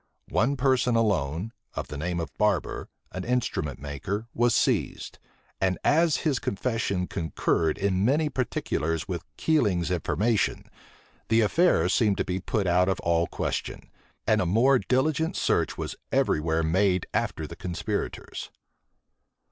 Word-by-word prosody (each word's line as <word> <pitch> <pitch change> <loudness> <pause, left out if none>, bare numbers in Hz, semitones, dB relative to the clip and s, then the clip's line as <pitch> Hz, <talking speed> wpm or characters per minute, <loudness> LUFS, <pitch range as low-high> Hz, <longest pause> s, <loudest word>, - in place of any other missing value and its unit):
One 140 +3 +2
person 125 -2 +2
alone, 100 -2 0 0.2
of - - -4
the - - -6
name 85 +2 -2
of 80 -4 -5
Barber, 105 -6 0 0.2
an 95 - -5
instrument 115 - -1
maker, 75 +10 -4
was 120 0 +2
seized; - - 0 0.4
and 95 -1 +2
as 160 +1 +4
his 145 -5 +2
confession 100 -4 -1
concurred 80 -2 0
in 95 -1 +1
many 145 +7 +3
particulars 80 - -2
with 85 -4 -4
Keiling's 100 - +1
information, 105 +6 0 0.6
the 115 0 +4
affair 110 - +3
seemed 100 +1 +2
to - - 0
be 90 +1 -2
put 100 +2 -1
out 90 +1 +3
of 95 - 0
all 85 0 +2
question; - - -4 0.3
and 110 0 +3
a 90 - 0
more 125 +8 +4
diligent 150 +6 +1
search - - +1
was - - -4 0.2
every - - +2
where 80 +1 0
made 90 +2 +2
after - - -1
the - - -8
conspirators. 85 -3 -4
100 Hz, 140 wpm, -27 LUFS, 85-120 Hz, 0.6 s, as